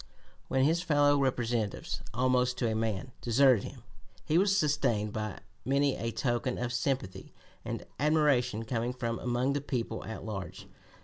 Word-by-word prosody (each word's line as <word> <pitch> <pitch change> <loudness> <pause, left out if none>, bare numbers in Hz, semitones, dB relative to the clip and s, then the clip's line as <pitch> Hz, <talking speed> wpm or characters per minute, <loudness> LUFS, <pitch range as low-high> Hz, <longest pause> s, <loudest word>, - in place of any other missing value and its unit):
When 130 - +2
his 165 +4 +3
fellow 145 -4 +4
Representatives, 120 -5 -1
almost 125 +1 +1
to 120 - 0
a 110 - 0
man, 110 +1 -2
deserted 125 -2 +4
him, - - -10 0.4
he 160 +3 +3
was 195 +1 +3
sustained 130 - +1
by 110 -3 -4 0.2
many 140 +1 +2
a 115 - -3
token 120 +1 -1
of 125 0 -2
sympathy 125 -5 -2 0.3
and - - -5
admiration 140 -7 +2
coming 120 +1 -1
from 115 -2 -3
among 125 +2 0
the 145 - -1
people 120 -5 -3
at 110 - -7
large. 95 -5 -6
125 Hz, 150 wpm, -30 LUFS, 115-140 Hz, 0.4 s, fellow